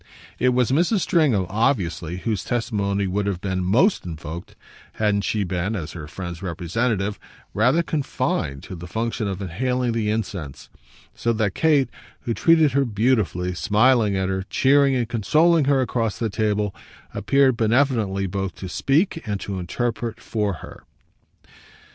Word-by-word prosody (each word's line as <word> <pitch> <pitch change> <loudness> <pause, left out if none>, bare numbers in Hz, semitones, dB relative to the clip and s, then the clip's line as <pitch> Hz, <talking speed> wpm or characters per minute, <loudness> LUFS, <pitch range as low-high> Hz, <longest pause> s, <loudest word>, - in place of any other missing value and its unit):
It 125 - +3
was 125 -1 +2
Mrs. 175 - +2
Stringham, 140 - +2
obviously, 95 - 0
whose 105 0 -2
testimony 100 -5 -1
would 100 +2 -1
have 95 -3 -1
been 95 -1 -2
most 125 - +3
invoked 80 0 -7 0.4
hadn't 105 -2 +1
she 105 -2 0
been, 90 +3 -2
as 85 -5 -5
her 80 -4 -8
friend's 85 +2 -7
representative, 100 +4 -1 0.3
rather 125 +11 +3
confined 135 - -2
to 95 - -8
the 85 +1 -8
function 115 +2 -2
of 95 0 -4
inhaling 125 +7 -1
the 115 -2 -1
incense; 95 -10 -4 0.4
so 115 - -1
that 110 -3 0
Kate, 150 -4 +3 0.3
who 115 - -2
treated 160 +1 +4
her 140 +2 +2
beautifully, 105 -6 0
smiling 105 +2 +3
at 95 0 0
her, 95 0 -1
cheering 140 0 +4
and 120 -3 0
consoling 155 - +3
her 140 -1 +3
across 115 -4 -1
the 115 -3 -2
table, 105 -2 0 0.4
appeared 135 -2 +3
benevolently 115 -4 +1
both 95 -1 -3
to 95 - -7
speak 160 - +1
and 100 -2 -2
to 95 -2 -4
interpret 115 +5 -3
for 105 -3 -2
her. - - -13
110 Hz, 150 wpm, -23 LUFS, 95-125 Hz, 0.4 s, treated